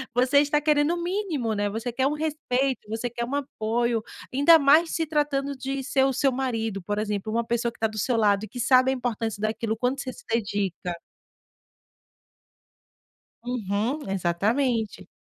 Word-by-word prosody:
Você 255 +3 +4
está 295 +1 +1
querendo 300 +1 +3
o 345 - -3
mínimo, 345 - -1
né. 205 0 0
Você 225 +4 -4
quer 260 +3 0
um 290 - 0
respeito, 275 -6 -1
você 225 +3 -3
quer 235 0 -3
um 250 - -6
apoio. 235 -4 -1 0.3
Ainda 290 +5 +7
mais 310 +4 +5
se 325 -1 -1
tratando 285 -2 0
de 270 +1 -3
ser 265 +1 +2
o 270 - +1
seu 270 +2 +2
marido, 225 -6 -2
por 205 +3 -2
exemplo, 210 0 -2
uma 235 +1 +1
pessoa 235 0 0
que - - -23
tá 220 - +2
do 215 0 -9
seu 240 +4 0
lado, 205 -2 +3
e - - -5
que 245 +5 -9
sabe 255 +2 +4
a - - +1
importância 230 -4 -3
daquilo, 220 +1 -1
o - - -6
quanto 255 +4 -1
você 260 - -5
se - - -14
dedica. 200 -5 -1 2.5
Uhum, 240 +3 -2
exatamente. 215 +6 0
245 Hz, 180 wpm, -25 LUFS, 220-275 Hz, 2.5 s, Ainda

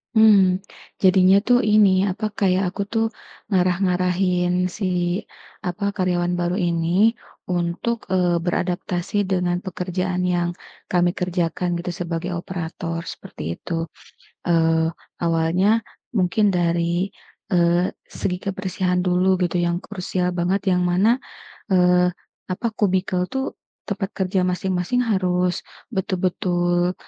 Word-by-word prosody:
Mmm. 195 -4 +6 0.4
Jadinya 185 0 +5
tuh 245 +1 +4
ini, 205 -3 +5
apa, 210 +4 -4
kayak 190 -1 +3
aku 200 - -2
tuh 225 -1 +2 0.4
ngarah-ngarahin 180 -1 +1 0.2
si, 190 +4 -7 0.8
apa, 180 +3 -4
karyawan 180 -2 0
baru 175 +1 0
ini, 175 +6 +2 0.3
untuk, 175 +6 -1
eee, 180 -2 +2
beradaptasi 175 +1 -2 0.2
dengan 180 -1 +1
pekerjaan 180 0 -2
yang 175 -1 +1 0.4
kami 175 -1 +3
kerjakan 175 -1 -1
gitu, 175 +1 -3
sebagai 170 0 -3
operator, 170 -1 -4
seperti 80 +2 -6
itu. 165 -1 -4 0.6
Eee, 165 -1 +3 0.3
awalnya 170 +6 +2 0.3
mungkin 205 -1 +2
dari, 170 +1 +1 0.4
eee, 175 0 +2 0.2
segi 180 -1 -1
kebersihan 185 -2 -1
dulu 180 +1 +2
gitu, 175 0 -1
yang 170 0 0
krusial 185 -2 -3
banget, 180 +3 +1 0.2
yang 180 - +1
mana, 220 +8 +3 0.5
eee, 180 -1 +4 0.3
apa, 185 +5 -3
cubicle 185 -2 +1
tuh, 265 +3 -4 0.3
tempat 200 -1 -3
kerja 185 -1 0
masing-masing 180 +5 0
harus 180 -6 0 0.2
betul-betul, 180 -3 0
180 Hz, 110 wpm, -22 LUFS, 175-190 Hz, 0.8 s, Mmm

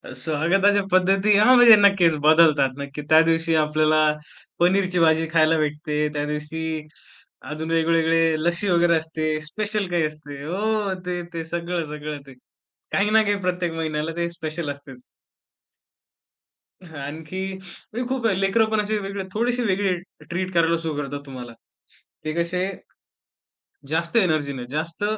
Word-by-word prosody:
स्वागताच्या 170 +9 +1
पद्धती 195 +3 +3
हां, 250 +5 +6
म्हणजे 240 -3 +9
नक्कीच 195 -6 +4
बदलतात. 155 -4 +5
नक्की 140 +1 -6
त्या 160 +1 +7
दिवशी 165 0 +1
आपल्याला 155 0 +2 0.6
पनीरची 180 0 +2
भाजी 160 0 +3
खायला 160 0 +4
भेटते, 150 0 -1
त्या 145 0 -2
दिवशी 155 +1 -4 0.7
अजून 160 +1 -5
वेगवेगळे 165 0 +2
लस्सी 175 +3 0
वगैरे 170 -1 +3
असते, 155 -1 -3
स्पेशल 205 +5 -2
काही 175 -2 +1
असते 150 -2 -8
हो, 205 +4 -1
ते, 180 -1 -3
ते 165 -1 -4
सगळं, 170 +1 -3
सगळं 150 -1 -6
ते. 135 - -12 0.6
काही 205 +2 +1
ना 220 0 +5
काही 205 -1 +1
प्रत्येक 180 -2 -1
महिन्याला 155 -1 -3
ते 170 0 -1
स्पेशल 160 -2 -5
असतेच. 135 -3 -12 1.8
हां, 160 -4 -11
आणखी 155 +6 -6
म्हणजे 195 +6 -8
खूप 260 -3 -2
आहे, 190 -2 0
लेकरं 195 +3 +2
पण 220 -1 0
असे 215 +1 -1
वेगळे 195 0 -5
थोडेसे 240 +2 0
वेगळे 195 -2 +1 0.4
ट्रीट 185 +2 -3
करायला 165 0 +2
सुरु 160 -2 -4
करतात 140 0 -5
तुम्हाला. 125 -3 -9 0.7
ते 155 - -2
कसे 170 +2 -1 1.3
जास्त 170 +7 -1
एनर्जी 155 -8 +2
ने, 125 -2 -6
जास्त 160 +6 -4
165 Hz, 145 wpm, -23 LUFS, 155-190 Hz, 1.8 s, म्हणजे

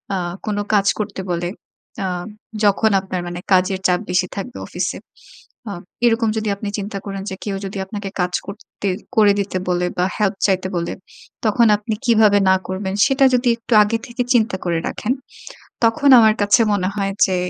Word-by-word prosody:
আ - - 0 0.3
কোন 210 -2 -2 0.2
কাজ 200 -2 +3
করতে 205 -2 -3
বলে, 175 0 -1 0.6
আ - - 0 0.6
যখন 210 +2 +3
আপনার 190 -2 -4
মানে 175 0 -5
কাজের 185 +1 +2
চাপ 180 -1 +2
বেশি 180 0 +1
থাকবে 225 +6 -6
অফিসে। - - -3 0.7
আ - - -4 0.3
এরকম 225 -1 +3
যদি 215 -1 -1
আপনি 200 +1 -5
চিন্তা 200 0 -5
করেন 195 -1 -5
যে - - -4
কেউ 200 -2 -2
যদি 195 +1 -6
আপনাকে 205 0 -6
কাজ 180 0 -1
করতে 200 0 -7 0.3
করে 210 -2 +6
দিতে 195 -1 -2
বলে 180 0 +1
বা, 180 - +2
হেল্প 210 -1 +1
চাইতে 190 -1 0
বলে, 170 0 -2 0.5
তখন 225 +2 +4
আপনি 210 +2 -4
কিভাবে 215 -3 +5
না 190 - +6
করবেন, 190 +1 -3
সেটা 270 0 +3
যদি 245 0 +2
একটু 230 +1 -3
আগে 220 +2 0
থেকে 245 0 -2
চিন্তা 225 -4 +2
করে 170 -2 0
রাখেন, 235 - -2 0.7
তখন 280 +6 +3
আমার 220 -1 +5
কাছে 205 +3 +4
মনে 185 -2 0
হয় 195 -1 -1
যে 190 -1 -1
205 Hz, 180 wpm, -20 LUFS, 190-220 Hz, 0.7 s, করে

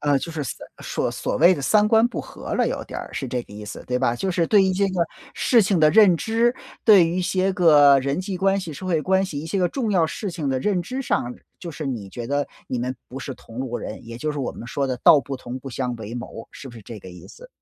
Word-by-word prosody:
呃， 145 -1 +2
就 165 - -6
是 155 -3 -4
所 - - -6 0.2
所 - - -2
所 - - -3
谓 175 +3 +7
的 140 - -6
三 210 +7 +4
观 225 +1 +5
不 - - -4
和 - - -7
了 - - +2
有 - - -4
点 - - -7
儿， - - -9
是 135 - -4
这 125 -1 -3
个 105 - -16
意 105 +1 -8
思， 105 - -8
对 125 0 0
吧？ 120 - +1
就 190 +10 -2
是 170 -2 +1
对 205 -3 +5
于 190 0 +2
这 200 +2 +1
个 180 -3 0 0.3
事 240 -3 +4
情 185 -3 +1
的 155 0 +6
认 205 -6 +6
知， 230 +6 +1 0.3
对 200 -6 +7
于 175 - -2
一 - - 0
些 190 +2 +1
个 145 -6 +6
人 140 +5 -1
际 190 0 -4
关 195 +1 +2
系、 170 -4 -6
社 185 +6 -8
会 165 -4 +1
关 190 +1 +2
系 145 -6 -5
一 160 - -7
些 190 +4 -2
个 180 -1 +2
重 240 -6 -2
要 175 -5 +3
事 195 +5 -4
情 155 -5 -3
的 130 -1 0
认 190 0 +1
知 260 +9 -4
上， 125 - -1 0.2
就 175 - -7
是 155 - -6
你 110 -7 -4
觉 120 +3 -7
得 145 0 0 0.2
你 125 - -2
们 125 +2 -2
不 130 - -7
是 120 - -6
同 115 +2 -13
路 130 -2 -3
人， - - -7
也 115 0 -7
就 155 +2 -2
是 150 - -4
我 135 - -2
们 115 - -9
说 140 0 -1
的 130 -1 -2
“道 150 - +7
不 135 +1 -6
同， 125 0 -7
不 135 - -9
相 125 -1 -3
为 110 +1 -7
谋”， 120 -2 -8
是 135 - -10
不 120 - -12
是 115 - -11
这 105 +1 -9
个 95 - -11
意 90 - -12
思？ - - -14
155 Hz, 310 characters per minute, -23 LUFS, 125-190 Hz, 0.3 s, 谓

